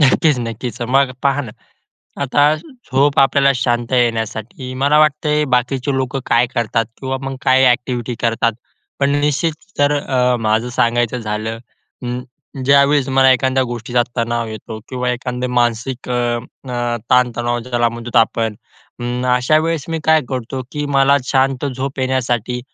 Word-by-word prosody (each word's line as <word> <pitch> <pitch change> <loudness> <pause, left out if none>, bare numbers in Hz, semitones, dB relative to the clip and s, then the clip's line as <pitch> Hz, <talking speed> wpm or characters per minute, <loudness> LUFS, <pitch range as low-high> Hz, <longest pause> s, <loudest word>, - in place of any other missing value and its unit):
नक्कीच, 145 0 +4
नक्कीच. 120 +2 -6
मग 130 +2 +2
पहा 140 0 +2
ना, 120 - -8 0.7
आता 140 +1 +2
झोप 145 - -1
आपल्याला 140 +1 +4
शांत 120 -1 -1
येण्यासाठी, 115 +1 -1
मला 140 +3 +3
वाटतंय 150 0 +2
बाकीचे 130 +3 0
लोकं 130 0 -2
काय 120 +1 +3
करतात 115 -1 0 0.2
किंवा 135 0 -2
मग 135 0 -4
काय 130 +1 +4
ॲक्टिव्हिटी 125 -1 0
करतात? 115 0 +1 0.5
पण 140 0 +3
निश्चित 150 +3 +1 0.3
तर 145 0 +3
अ, 125 -3 +1
माझं 110 +2 +1
सांगायचं 120 0 +1
झालं, 110 +1 -3 0.5
अं, 125 +1 -3 0.4
ज्यावेळेस 140 0 +4
मला 135 0 +5
एखाद्या 130 +1 +1
गोष्टीचा 120 0 -1
तणाव 115 0 -1
येतो 110 +1 -7
किंवा 125 -1 -2
एखादं 125 0 -3
मानसिक 120 +2 -1
अ, - - 0 0.6
अ, 120 -1 -1
ताणतणाव 120 -1 +2
ज्याला 120 -1 0
म्हणतो 115 0 -1
आपण. 115 -1 +1 0.5
अं, 120 +1 -2
अशा 130 +5 +3
वेळेस 160 -2 -1
मी 165 0 -2
काय 160 0 +5
करतो 130 0 -4
की 145 0 -3
मला 135 +1 +5
शांत 135 0 +1
झोप 135 +1 -4
येण्यासाठी, 125 -2 -1
125 Hz, 145 wpm, -18 LUFS, 120-135 Hz, 0.7 s, मला